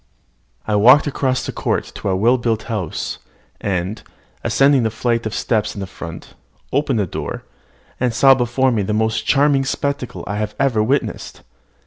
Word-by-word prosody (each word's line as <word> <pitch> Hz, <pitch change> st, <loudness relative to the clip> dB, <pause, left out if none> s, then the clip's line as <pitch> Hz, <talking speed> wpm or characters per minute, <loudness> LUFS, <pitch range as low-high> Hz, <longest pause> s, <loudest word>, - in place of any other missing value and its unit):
I 110 Hz, -, 0 dB
walked 125 Hz, +7 st, +7 dB
across 130 Hz, -3 st, -1 dB
the -, -, -3 dB
court -, -, -2 dB
to -, -, -4 dB
a 95 Hz, -, +1 dB
well 120 Hz, +6 st, +3 dB
built 115 Hz, -2 st, -1 dB
house, 105 Hz, -9 st, -4 dB, 0.4 s
and, 95 Hz, +2 st, -2 dB, 0.4 s
ascending 135 Hz, -1 st, +4 dB
the 110 Hz, -, +1 dB
flight 115 Hz, 0 st, -1 dB
of 110 Hz, -, -5 dB
steps 105 Hz, -3 st, 0 dB
in 100 Hz, -2 st, -4 dB
front, 85 Hz, -2 st, -9 dB, 0.4 s
opened 140 Hz, -2 st, +1 dB
the 105 Hz, -, +1 dB
door, -, -, -5 dB, 0.6 s
and 125 Hz, -1 st, +1 dB
saw 135 Hz, +4 st, +6 dB
before 130 Hz, +1 st, +1 dB
me 110 Hz, -4 st, +1 dB
the 100 Hz, +2 st, -2 dB
most 110 Hz, +1 st, 0 dB
charming 140 Hz, -1 st, +3 dB
spectacle 140 Hz, -1 st, -3 dB
I 105 Hz, +1 st, -3 dB
had 105 Hz, 0 st, -3 dB
ever 130 Hz, -6 st, +2 dB
witnessed. 130 Hz, +7 st, -2 dB
115 Hz, 165 wpm, -19 LUFS, 105-135 Hz, 0.6 s, walked